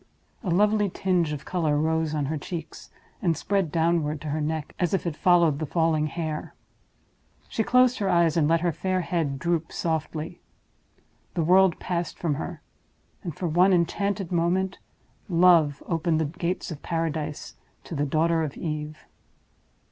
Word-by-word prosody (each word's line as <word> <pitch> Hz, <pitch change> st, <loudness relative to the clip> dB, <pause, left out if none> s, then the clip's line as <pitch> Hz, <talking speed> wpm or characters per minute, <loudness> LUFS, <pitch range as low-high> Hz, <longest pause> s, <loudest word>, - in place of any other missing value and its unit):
A 190 Hz, -, -2 dB
lovely 205 Hz, +3 st, +3 dB
tinge 180 Hz, -4 st, 0 dB
of 150 Hz, -1 st, -5 dB
color 160 Hz, -5 st, 0 dB
rose 160 Hz, 0 st, 0 dB
on 145 Hz, -2 st, 0 dB
her 155 Hz, +3 st, -2 dB
cheeks, 165 Hz, +1 st, -7 dB, 0.3 s
and 170 Hz, -6 st, +1 dB
spread 195 Hz, -5 st, 0 dB
downward 160 Hz, -2 st, +1 dB
to 150 Hz, -, -5 dB
her 155 Hz, +2 st, -1 dB
neck, 155 Hz, 0 st, -3 dB
as 175 Hz, +1 st, +1 dB
if 185 Hz, -, -3 dB
it 170 Hz, -3 st, -2 dB
followed 170 Hz, -4 st, +4 dB
the 155 Hz, -, -3 dB
falling 160 Hz, -1 st, +1 dB
hair. 155 Hz, -1 st, -4 dB, 0.9 s
She -, -, -2 dB
closed 250 Hz, +1 st, +4 dB
her 200 Hz, -2 st, 0 dB
eyes, 170 Hz, -3 st, +3 dB
and 160 Hz, -3 st, +3 dB
let 165 Hz, +1 st, +3 dB
her 175 Hz, -1 st, +1 dB
fair 185 Hz, +3 st, -1 dB
head 160 Hz, -5 st, -1 dB
droop 165 Hz, +2 st, -1 dB
softly. 160 Hz, 0 st, -3 dB, 0.9 s
The 170 Hz, -, +1 dB
world 185 Hz, +1 st, +5 dB
passed 175 Hz, -2 st, -3 dB
from 165 Hz, -4 st, 0 dB
her; 145 Hz, -, -6 dB, 0.6 s
and, 170 Hz, -6 st, -6 dB
for 180 Hz, -, -3 dB
one 180 Hz, +4 st, +4 dB
enchanted 195 Hz, +2 st, 0 dB
moment, 180 Hz, +2 st, 0 dB, 0.5 s
Love 170 Hz, -5 st, +4 dB
opened 165 Hz, -1 st, 0 dB
the 160 Hz, -, +1 dB
gates 170 Hz, +4 st, -3 dB
of 150 Hz, -, -7 dB
Paradise 160 Hz, -3 st, -3 dB, 0.3 s
to -, -, -9 dB
the 145 Hz, -2 st, 0 dB
daughter 165 Hz, +3 st, +2 dB
of 150 Hz, -3 st, -4 dB
Eve. 155 Hz, -2 st, -5 dB
165 Hz, 165 wpm, -26 LUFS, 155-180 Hz, 0.9 s, world